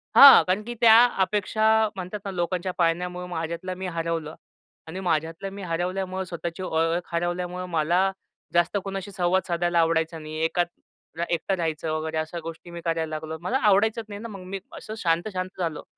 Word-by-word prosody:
हां. 280 Hz, -1 st, +11 dB
कारण 185 Hz, +3 st, +1 dB
की 240 Hz, +2 st, -5 dB
त्या 225 Hz, -1 st, +8 dB, 0.3 s
अपेक्षा 210 Hz, +2 st, 0 dB, 0.3 s
म्हणतात 185 Hz, +2 st, -5 dB
ना 195 Hz, -, -3 dB
लोकांच्या 180 Hz, +1 st, -2 dB
पाळण्यामुळं 180 Hz, +1 st, 0 dB
माझ्यातला 170 Hz, +2 st, -4 dB
मी 185 Hz, 0 st, -5 dB
हरवलं 165 Hz, -2 st, -3 dB, 0.5 s
आणि 180 Hz, +4 st, -6 dB
माझ्यातला 165 Hz, +1 st, -1 dB
मी 195 Hz, +1 st, -8 dB
हरवल्यामुळं 185 Hz, +2 st, -2 dB
स्वतःची 170 Hz, 0 st, -5 dB
ओ -, -, -4 dB
ओळख 165 Hz, +2 st, 0 dB
हरवल्यामुळं 175 Hz, +1 st, -2 dB
मला 170 Hz, +2 st, +2 dB, 0.5 s
जास्त 175 Hz, +3 st, +2 dB
कोणाशी 195 Hz, 0 st, -5 dB
संवाद 185 Hz, 0 st, +1 dB
साधायला 175 Hz, -1 st, +1 dB
आवडायचा 165 Hz, 0 st, +1 dB
नाही. 155 Hz, 0 st, -8 dB
एकात 175 Hz, +1 st, +1 dB, 0.5 s
अ, 170 Hz, -, +1 dB
एकटा 175 Hz, +3 st, 0 dB
राहायचं 160 Hz, -2 st, -2 dB
वगैरे 160 Hz, 0 st, -2 dB
अशा 155 Hz, +2 st, -3 dB
गोष्टी 165 Hz, +1 st, -8 dB
मी 170 Hz, 0 st, -7 dB
करायला 165 Hz, -1 st, 0 dB
लागलो, 160 Hz, +1 st, -5 dB
मला 210 Hz, +9 st, 0 dB
आवडायचंच 220 Hz, 0 st, +3 dB
नाही 205 Hz, 0 st, -7 dB
ना 230 Hz, -, -5 dB
मग 200 Hz, -4 st, -9 dB
मी 195 Hz, -, -2 dB, 0.2 s
असं 215 Hz, -, -8 dB
शांत, 170 Hz, -1 st, +1 dB
शांत 185 Hz, 0 st, -4 dB
झालो. 165 Hz, -4 st, -2 dB
175 Hz, 175 wpm, -25 LUFS, 165-190 Hz, 0.5 s, हां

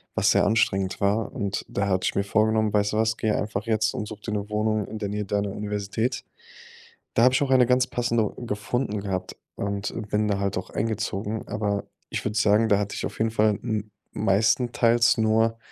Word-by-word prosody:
was -, -, +3 dB
sehr -, -, +4 dB
anstrengend 100 Hz, -3 st, +1 dB
war. 105 Hz, +2 st, +1 dB
Und 100 Hz, -2 st, -3 dB
daher 100 Hz, 0 st, -1 dB
hatte 95 Hz, 0 st, 0 dB
ich -, -, 0 dB
mir 100 Hz, -, +2 dB
vorgenommen: 110 Hz, +1 st, +2 dB
„Weißt 105 Hz, 0 st, +2 dB
du -, -, 0 dB
was, 110 Hz, 0 st, +1 dB
gehe 110 Hz, -1 st, 0 dB
einfach 105 Hz, 0 st, -2 dB
jetzt 110 Hz, 0 st, +1 dB
und 105 Hz, -, -4 dB
such 105 Hz, 0 st, -9 dB
dir 110 Hz, -, -5 dB
'ne 105 Hz, 0 st, -3 dB
Wohnung 105 Hz, 0 st, 0 dB
in 110 Hz, -, -6 dB
der 105 Hz, -2 st, -3 dB
Nähe 105 Hz, +1 st, -3 dB
deiner 100 Hz, 0 st, -1 dB
Universität.“ 105 Hz, +4 st, -2 dB, 0.9 s
Da 115 Hz, -, +3 dB
habe 125 Hz, +1 st, +6 dB
ich -, -, +2 dB
auch 135 Hz, -, -1 dB
eine 130 Hz, -1 st, +6 dB
ganz 125 Hz, 0 st, +3 dB
passende 120 Hz, -3 st, 0 dB
gefunden 105 Hz, 0 st, -2 dB
gehabt 95 Hz, -2 st, -4 dB, 0.2 s
und 100 Hz, 0 st, -3 dB, 0.2 s
bin 105 Hz, 0 st, +1 dB
da 100 Hz, -1 st, 0 dB
halt 100 Hz, 0 st, -1 dB
auch -, -, -5 dB
eingezogen. 110 Hz, -1 st, -3 dB
Aber 100 Hz, -1 st, -2 dB, 0.2 s
ich -, -, -3 dB
würde 105 Hz, +1 st, -2 dB
sagen, 110 Hz, +1 st, +4 dB
da 100 Hz, -, +5 dB
hatte 105 Hz, 0 st, -2 dB
ich -, -, -3 dB
auf -, -, -6 dB
jeden 110 Hz, 0 st, +1 dB
Fall 105 Hz, -2 st, +2 dB
m 105 Hz, -1 st, -3 dB, 0.2 s
meistenteils 115 Hz, +3 st, +3 dB
nur, 110 Hz, +1 st, +2 dB
105 Hz, 205 wpm, -25 LUFS, 100-110 Hz, 0.9 s, habe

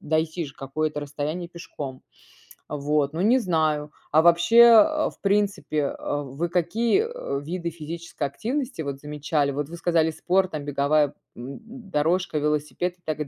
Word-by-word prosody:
дойти 160 Hz, +1 st, -1 dB
же 135 Hz, -, -12 dB
какое-то 150 Hz, +2 st, -3 dB
расстояние 150 Hz, +4 st, -4 dB
пешком, 145 Hz, -6 st, -8 dB, 0.7 s
вот 145 Hz, 0 st, 0 dB
ну 165 Hz, -, -2 dB
не 235 Hz, +6 st, +5 dB
знаю. 155 Hz, -, 0 dB, 0.2 s
А 155 Hz, +2 st, +5 dB
вообще, 170 Hz, +6 st, +4 dB, 0.3 s
э, 310 Hz, +5 st, 0 dB
в -, -, -23 dB
принципе, 200 Hz, -5 st, 0 dB, 0.2 s
э, 145 Hz, 0 st, -2 dB
вы 140 Hz, +6 st, -4 dB
какие, 220 Hz, -, +2 dB
э, 470 Hz, -, -4 dB
виды 170 Hz, +2 st, -3 dB
физической 165 Hz, +1 st, -7 dB
активности 235 Hz, -, -3 dB
вот 140 Hz, -2 st, -4 dB
замечали? 150 Hz, 0 st, -1 dB
Вот 145 Hz, +1 st, -3 dB
вы 170 Hz, -, -7 dB
сказали 165 Hz, -2 st, +2 dB
спорт 185 Hz, +4 st, +1 dB
там, 145 Hz, -2 st, -4 dB
беговая, 145 Hz, +1 st, +2 dB, 0.2 s
м, 125 Hz, -, -8 dB, 0.3 s
дорожка, 165 Hz, +1 st, +1 dB
велосипед 150 Hz, +3 st, -1 dB
и -, -, -38 dB
так 155 Hz, -1 st, -3 dB
155 Hz, 155 wpm, -25 LUFS, 145-175 Hz, 0.7 s, не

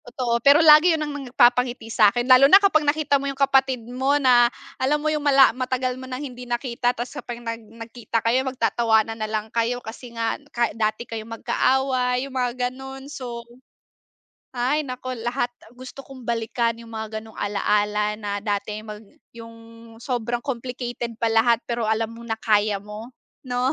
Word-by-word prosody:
Totoo, 240 Hz, -1 st, -2 dB
pero 285 Hz, +5 st, +6 dB
lagi 305 Hz, +3 st, +8 dB
'yon 305 Hz, -, -2 dB
ang 295 Hz, -, -5 dB, 0.2 s
nagpapangiti 245 Hz, -2 st, +2 dB
sa 210 Hz, -2 st, +6 dB
akin 240 Hz, +2 st, -2 dB
lalo 255 Hz, +2 st, +7 dB
na 385 Hz, -, +10 dB
kapag 395 Hz, -6 st, +3 dB
nakita 290 Hz, -1 st, +1 dB
mo 280 Hz, -, -2 dB
yung 275 Hz, -, -6 dB
kapatid 270 Hz, -3 st, +2 dB
mo 260 Hz, +4 st, 0 dB
na 245 Hz, -4 st, +5 dB, 0.3 s
alam 275 Hz, +3 st, +2 dB
mo 310 Hz, +1 st, -1 dB
yung 300 Hz, -, -1 dB
mala 275 Hz, -3 st, +5 dB
matagal 255 Hz, 0 st, -2 dB
mo 260 Hz, +1 st, -10 dB
ng 255 Hz, -, -4 dB
hindi 250 Hz, -3 st, -8 dB
nakita 240 Hz, 0 st, -1 dB
tapos 245 Hz, 0 st, -4 dB
kapag 240 Hz, -, -7 dB
nag 230 Hz, -1 st, -6 dB
nagkita 230 Hz, 0 st, -5 dB
kayo 240 Hz, +3 st, +3 dB
magtatawanan 230 Hz, -4 st, +1 dB
nalang 215 Hz, 0 st, -3 dB
kayo 235 Hz, +1 st, 0 dB
kasi 245 Hz, +1 st, -10 dB
nga 230 Hz, 0 st, -2 dB
ka 235 Hz, 0 st, -1 dB
dati 215 Hz, +1 st, -2 dB
kayo 225 Hz, -2 st, -6 dB
magka 230 Hz, -1 st, -5 dB, 0.2 s
away, 255 Hz, -1 st, 0 dB
yung 275 Hz, -, -11 dB
mga 250 Hz, -1 st, -1 dB
ganon. 265 Hz, +1 st, -9 dB
So, 240 Hz, -5 st, -7 dB, 1.1 s
ay 260 Hz, +5 st, 0 dB
nako 255 Hz, -1 st, -6 dB
lahat 240 Hz, +2 st, -2 dB, 0.2 s
gusto 255 Hz, +2 st, -11 dB
kong 260 Hz, -3 st, -13 dB
balikan 230 Hz, 0 st, -1 dB
yung 230 Hz, 0 st, -13 dB
mga 220 Hz, 0 st, -5 dB
ganong 220 Hz, -, -15 dB
alaala 210 Hz, +1 st, 0 dB
na 205 Hz, -1 st, -4 dB
dati 210 Hz, 0 st, -2 dB
mag 210 Hz, -1 st, -8 dB, 0.3 s
yung 230 Hz, 0 st, -11 dB, 0.4 s
sobrang 240 Hz, 0 st, -3 dB
complicated 245 Hz, -2 st, -5 dB
pa 230 Hz, 0 st, 0 dB
lahat 230 Hz, +1 st, +3 dB
pero 235 Hz, -2 st, -2 dB
alam 220 Hz, +1 st, 0 dB
mo 230 Hz, -, -12 dB
na 225 Hz, -, -1 dB
kaya 210 Hz, -2 st, +1 dB
mo 210 Hz, +3 st, -9 dB, 0.3 s
'no? 255 Hz, +1 st, -1 dB
240 Hz, 175 wpm, -23 LUFS, 230-260 Hz, 1.1 s, na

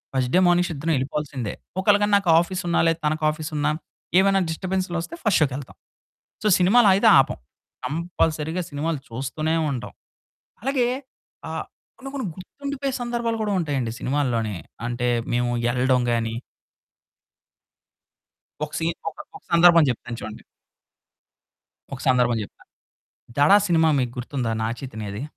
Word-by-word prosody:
First 125 Hz, -1 st, 0 dB
day -, -, +6 dB
morning 175 Hz, 0 st, +3 dB
show -, -, -3 dB
ఇద్దరం 160 Hz, +3 st, -1 dB
ఎళ్ళిపోవాల్సిందే. 135 Hz, -4 st, -3 dB, 0.3 s
ఒకాళ 205 Hz, 0 st, +5 dB
గానీ 205 Hz, 0 st, +1 dB
నాకు 195 Hz, -4 st, -1 dB
ఆఫీసున్నా, 175 Hz, -1 st, -1 dB
లేదా 165 Hz, 0 st, +1 dB
తనకి 155 Hz, +1 st, 0 dB
ఆఫీసున్నా, 150 Hz, -1 st, -2 dB, 0.5 s
ఏమైనా 195 Hz, 0 st, +4 dB
డిస్టర్బెన్స్‌‌లొస్తే 185 Hz, -, -3 dB
ఫస్ట్ 210 Hz, -7 st, +3 dB
షో‌కెళ్తాం. 135 Hz, -1 st, -4 dB, 0.7 s
సో, -, -, +2 dB
సినిమాలయితే 195 Hz, +1 st, +5 dB
ఆపం. -, -, +1 dB, 0.5 s
కంపల్సరీ‌గా 165 Hz, +1 st, -1 dB
సినిమాలు 150 Hz, +1 st, -2 dB
చూస్తూనే 140 Hz, +7 st, -2 dB, 0.2 s
ఉంటాం. 125 Hz, -, -5 dB, 0.7 s
అలాగే 260 Hz, -2 st, +1 dB, 0.6 s
ఆహ్, -, -, -4 dB, 0.3 s
కొన్ని, 270 Hz, +1 st, -8 dB
కొన్ని 260 Hz, -, -2 dB
గుర్తుండిపోయే 280 Hz, +7 st, -5 dB
సందర్భాలు 235 Hz, -1 st, -1 dB
కూడా 205 Hz, -, -1 dB
ఉంటాయండి 135 Hz, -7 st, -1 dB
సినిమాల్లోనే. 120 Hz, -7 st, -1 dB, 0.3 s
అంటే 120 Hz, 0 st, -1 dB, 0.3 s
మేము 120 Hz, 0 st, +1 dB, 0.2 s
ఎళ్ళడం 125 Hz, +1 st, +2 dB
గాని 115 Hz, -1 st, -1 dB, 2.3 s
ఒక 150 Hz, -, -3 dB
సీన్ 165 Hz, +1 st, -1 dB
ఒక -, -, -22 dB, 0.2 s
ఒక -, -, -13 dB
సందర్భం 170 Hz, -1 st, +7 dB
చెప్తాను 120 Hz, 0 st, -5 dB
చూడండి. 110 Hz, 0 st, -8 dB, 1.5 s
ఒక 135 Hz, -, -6 dB
సందర్భం 125 Hz, -2 st, +3 dB
చెప్తా. -, -, -12 dB, 0.7 s
'దడ' 145 Hz, +8 st, +6 dB
సినిమా 160 Hz, -2 st, +4 dB
మీకు 120 Hz, -1 st, -2 dB
గుర్తుందా? 125 Hz, -2 st, -2 dB
నాగ 115 Hz, +1 st, -1 dB
చైతన్యది. 110 Hz, -3 st, -6 dB
155 Hz, 125 wpm, -23 LUFS, 125-185 Hz, 2.3 s, సందర్భం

